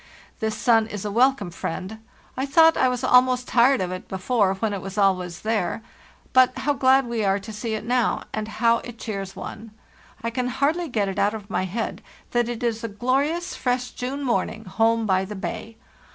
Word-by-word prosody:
This 220 -2 -2
sun 225 -3 +3
is 210 -2 -6
a 205 - -2
welcome 240 -4 +2
friend; 185 +6 -5 0.4
I 265 +2 -2
thought 325 +3 +6
I 255 - +3
was 250 0 -3
almost 250 0 +4
tired 250 +1 +4
of 180 -1 -2
it 185 0 -6
before 195 0 +1
when 210 +2 -1
it 195 - -4
was 195 +2 -7
always 185 -3 +1
there; 220 -1 -1 0.5
but 255 -1 +5
how 290 - +1
glad 265 0 +4
we 235 -2 -2
are 195 0 +2
to 205 +2 -8
see 220 +1 -3
it 215 - -5
now, 245 0 +1
and 215 0 -3
how 230 +1 +2
it 240 -2 -10
cheers 195 -3 -5
one. 225 +1 -8 0.5
I 230 - -1
can 250 +1 -1
hardly 295 +7 0
get 210 -5 0
it 195 - -3
out 205 +2 +2
of 205 -2 -9
my 185 - 0
head 215 +5 -4 0.3
that 240 -1 +1
it 240 0 -5
is 230 -1 -1
a - - -1
glorious, 275 - -1
fresh 250 -1 -1
June 270 +3 -4
morning 225 -3 -1
home 225 +3 +1
by 190 -2 +2
the 210 +2 -6
bay. 220 +3 -6
230 Hz, 205 wpm, -24 LUFS, 205-250 Hz, 0.5 s, thought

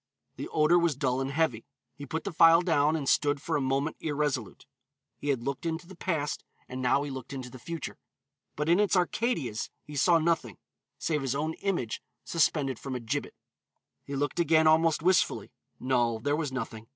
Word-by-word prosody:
The - - -6
odor 155 +3 +4
was 170 -4 +1
dull 130 -1 0
and 135 - -2
heavy. 140 -6 0 0.3
He 145 -1 -9
put 160 +4 -3
the 200 - -3
phial 165 +2 +7
down 155 -3 +3
and 145 -4 -3
stood 145 +1 +2
for 160 +3 -2
a 145 - +1
moment 135 +4 0
irresolute. 145 -7 -2 0.5
He 145 - -4
had 130 -4 0
looked 140 0 -3
into 165 +1 -3
the 190 +2 -12
past 155 -4 -2 0.2
and 130 +1 -6
now 130 +3 +2
he 145 - -5
looked 130 +1 -7
into 130 -2 -6
the 130 - -10
future. 165 +6 -6 0.6
But 150 +1 -2
in 170 +3 +4
its 205 -1 +3
Arcadias 175 - 0
he 150 - -10
saw 170 +4 +5
nothing, 160 - 0 0.4
save 155 -3 -1
his 135 0 -1
own 155 +3 -1
image 170 - -2 0.2
suspended 150 -6 +1
from 135 -2 -5
a - - -2
gibbet. 125 +5 -3 0.7
He 140 - -6
looked 145 +4 -1
again 160 -1 +4
almost 160 0 +4
wistfully; 185 0 +2 0.3
no, 120 -3 +1
there 145 +6 0
was 150 -3 -2
nothing. 115 -3 -5
145 Hz, 190 wpm, -29 LUFS, 130-165 Hz, 0.7 s, phial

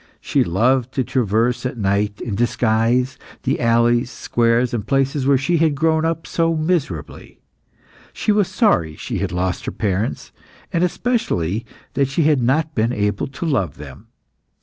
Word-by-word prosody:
She - - +1
loved 125 +8 +1
to 130 - +1
traverse 120 -1 0
at 125 -1 -3
night, 100 0 0
in 115 - -4
disguise, 120 +3 +1 0.2
the - - 0
alleys, 120 +1 +3
squares, 120 +1 +1
and 110 -3 -3
places 135 0 +1
where 140 -1 +5
she 155 +6 +1
had 155 -2 +2
grown 160 +2 +2
up 165 0 -2
so 165 -1 0
miserably. 155 - -3 0.7
She - - -1
was 205 -3 +2
sorry 85 - +1
she - - -4
had - - -2
lost 90 +1 -2
her - - -1
parents, 100 0 -2 0.4
and 170 - +2
especially 120 - -1 0.3
that 140 0 +1
she 135 +5 0
had 150 -3 +3
not 150 +6 +1
been 115 -1 +1
able 105 -3 -1
to 135 +5 -6
love 95 - 0
them. 75 +8 -11
125 Hz, 160 wpm, -20 LUFS, 105-150 Hz, 0.7 s, where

